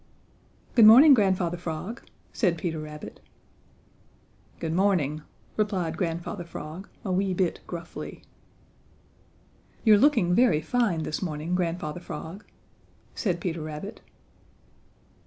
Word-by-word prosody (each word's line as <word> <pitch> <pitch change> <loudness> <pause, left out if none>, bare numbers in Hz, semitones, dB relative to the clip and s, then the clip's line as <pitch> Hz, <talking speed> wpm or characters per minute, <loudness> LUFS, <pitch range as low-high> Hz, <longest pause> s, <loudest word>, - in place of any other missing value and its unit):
"Good 225 -3 +8
morning, 270 +7 +9
Grandfather 190 -6 +2
Frog," 175 +7 -5 0.3
said 180 -7 +1
Peter 160 -1 -3
Rabbit. 150 0 -9 1.4
"Good 160 -1 -3
morning," 170 -6 +1 0.4
replied 190 -7 0
Grandfather 170 +2 -3
Frog 170 +2 -8 0.2
a 190 - -1
wee 190 0 0
bit 180 -2 0
gruffly. 170 -1 -8 1.6
"You're 215 -3 +6
looking 220 -10 +4
very 185 -7 +4
fine 175 -1 0
this 155 - -3
morning, 160 -1 -3
Grandfather 175 -2 -2
Frog," 175 +3 -8 0.7
said 180 -6 -1
Peter 170 -2 -3
Rabbit. 155 +7 -7
175 Hz, 105 wpm, -26 LUFS, 160-200 Hz, 1.6 s, morning